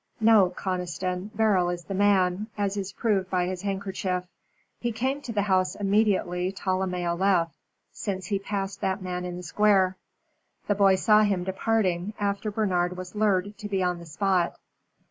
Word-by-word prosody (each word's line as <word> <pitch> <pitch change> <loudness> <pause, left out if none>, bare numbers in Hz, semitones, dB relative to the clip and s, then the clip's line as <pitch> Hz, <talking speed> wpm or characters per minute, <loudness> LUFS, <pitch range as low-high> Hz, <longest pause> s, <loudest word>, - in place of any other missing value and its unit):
No, 220 -4 +6
Conniston, 180 +1 -3
Beryl 200 -5 +3
is 175 0 -4
the 195 - -6
man, 195 0 +2
as 200 -1 0
is 195 -1 -3
proved 200 -5 0
by 180 -2 +1
his 185 0 -4
handkerchief. 195 -2 -2 0.6
He 240 - -1
came 260 +5 -1
to 245 - -6
the 205 -2 0
house 185 -2 +1
immediately 195 -3 +1
Tolomeo 185 -3 -1
left, 175 -3 +2 0.4
since 190 -4 -4
he 200 +1 -1
passed 195 -1 -4
that 190 +1 -1
man 180 -1 -3
in 175 0 -5
the 180 - -7
Square. 190 +1 +3 0.7
The 205 - +2
boy 195 -1 +5
saw 210 +3 +5
him 200 -4 +1
departing, 190 0 0
after 200 +1 -1
Bernard 180 -4 0
was 180 0 -7
lured 205 -1 +1
to 205 - -6
be 195 -2 0
on 180 -1 0
the 170 - -11
spot. 180 +2 0
190 Hz, 165 wpm, -26 LUFS, 180-205 Hz, 0.7 s, No